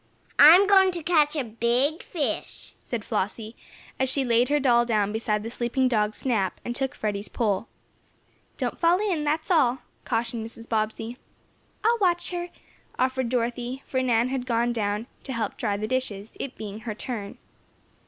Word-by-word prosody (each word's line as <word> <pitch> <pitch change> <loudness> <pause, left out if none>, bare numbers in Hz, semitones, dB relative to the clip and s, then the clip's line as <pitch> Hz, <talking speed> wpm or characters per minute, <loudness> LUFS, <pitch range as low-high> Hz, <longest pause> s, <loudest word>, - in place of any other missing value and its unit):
"I'm 335 +7 +9
going 385 -1 +6
to 340 -2 -5
catch 305 -2 +3
a 290 - 0
big 240 - +1
fish," 315 -6 -4
said 230 -4 -5
Flossie, 215 +3 -3 0.4
as 265 0 +1
she 270 +1 +1
laid 240 0 +2
her 295 0 +3
doll 240 -3 +4
down 210 -4 +1
beside 215 -1 -1
the 225 - -4
sleeping 245 +2 0
dog 215 -3 +1
Snap, 215 -8 -1
and 240 - -3
took 270 0 -2
Freddie's 205 -1 -3
pole. 215 -2 -1 0.9
"Don't - - -3
fall 340 +1 +4
in 375 -7 -1
that's 315 +4 -1
all," 260 -7 +3 0.2
cautioned 230 -1 -2
Mrs. 230 +1 -9
Bobbsey. 220 +2 -2 0.7
"I'll 465 +2 +3
watch 355 -3 +2
her," 350 0 -4 0.5
offered 260 -1 0
Dorothy, 245 +2 -2
for 260 - -1
Nan 240 -1 +2
had 260 -1 -3
gone 235 0 +1
down 210 -1 -1 0.2
to 265 - -6
help 225 -4 -2
dry 200 -1 -1
the 215 +1 -3
dishes, 220 -5 -3
it 275 - -5
being 210 -1 -6
her 220 -1 -5
"turn." 220 -4 -5
240 Hz, 170 wpm, -26 LUFS, 220-280 Hz, 0.9 s, I'm